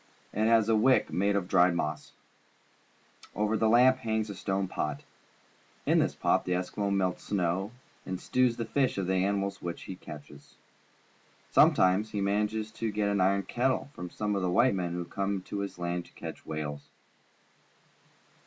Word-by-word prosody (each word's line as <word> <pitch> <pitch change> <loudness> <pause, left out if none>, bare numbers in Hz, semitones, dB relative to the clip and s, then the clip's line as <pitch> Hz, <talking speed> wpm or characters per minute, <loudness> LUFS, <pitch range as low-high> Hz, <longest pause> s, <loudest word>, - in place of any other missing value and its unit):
It 110 +2 +1
has 115 -2 +4
a 115 - +3
wick 130 +5 +3
made 100 +2 +1
of 100 -3 -1
dried 90 -1 +4
moss. 75 -3 -3 1.2
Over 105 +2 +1
the 110 0 +2
lamp 125 +3 +6
hangs 110 -3 -1
a - - -5
stone 95 +1 -1
pot. 75 -5 -3 0.8
In - - +4
this - - +1
pot - - +2
the 90 - -1
Eskimo 95 +3 -2
melts 95 -2 -1
snow 95 0 0 0.3
and 95 -1 -4
stews 125 +1 +1
the 115 - -2
flesh 130 +1 0
of 95 - -1
the 95 - 0
animals 100 0 -1
which 85 -1 -5
he 95 - -7
catches. 75 -4 -12 1.0
Sometimes 95 +4 +4
he 105 - -1
manages 105 +2 0
to 115 0 -3
get 105 0 0
an 100 -2 +1
iron 100 +1 +2
kettle 130 +6 -1
from 90 0 -7
some 105 +2 -2
of 100 - -1
the 90 - 0
white 120 +8 +4
men 90 -3 -2
who 90 0 -3
come 100 +1 -2
to 100 - -5
his 100 -2 -5
land 85 0 -3
to - - -22
catch - - -9
whales. 75 -2 -5
100 Hz, 175 wpm, -29 LUFS, 90-110 Hz, 1.2 s, lamp